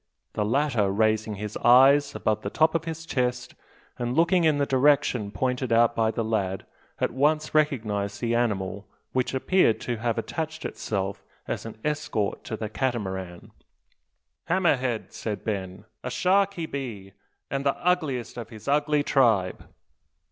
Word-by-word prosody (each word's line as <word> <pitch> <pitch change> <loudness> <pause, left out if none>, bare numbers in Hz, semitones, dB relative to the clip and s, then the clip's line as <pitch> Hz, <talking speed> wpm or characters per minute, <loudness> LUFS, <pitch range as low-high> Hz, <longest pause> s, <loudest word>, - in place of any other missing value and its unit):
The 105 - 0
latter, 120 -2 +1
raising 110 +1 +1
his 105 +1 -6
eyes 140 +4 +5
above 110 -1 0
the 100 - -3
top 160 +7 +2
of 165 0 -1
his 165 0 -5
chest, 125 -4 -1 0.5
and 120 +1 -2
looking 170 +2 +3
in 155 -2 +3
the 140 - +2
direction 130 -5 +2
pointed 125 +3 -2
out 115 +1 +4
by 110 -1 +2
the 115 +1 -2
lad, 100 -4 -1 0.3
at - - 0
once 150 +3 +1
recognised 105 -10 0
the 120 -1 -1
animal 100 -4 -1 0.2
which 130 +1 -1
appeared 130 -3 +3
to 120 -2 -3
have 115 0 -1
attached 160 -1 -4
itself 100 -2 -3 0.2
as - - -4
an 115 - -9
escort 145 -9 -1
to 110 - -4
the 110 - -3
Catamaran. 95 -7 -3 0.9
"Hammer 180 -5 +3
head!" 125 -4 -3
said 105 -2 -4
Ben; 95 -2 -4 0.2
"a 125 - -3
shark 195 +9 +2
he 170 - -3
be; 115 -10 -6 0.4
an' 135 - -1
the 140 0 0
ugliest 155 -10 -1
o' 115 - -5
his 110 +1 -13
ugly 145 +1 +2
tribe." 115 -11 +2
120 Hz, 155 wpm, -26 LUFS, 105-145 Hz, 0.9 s, eyes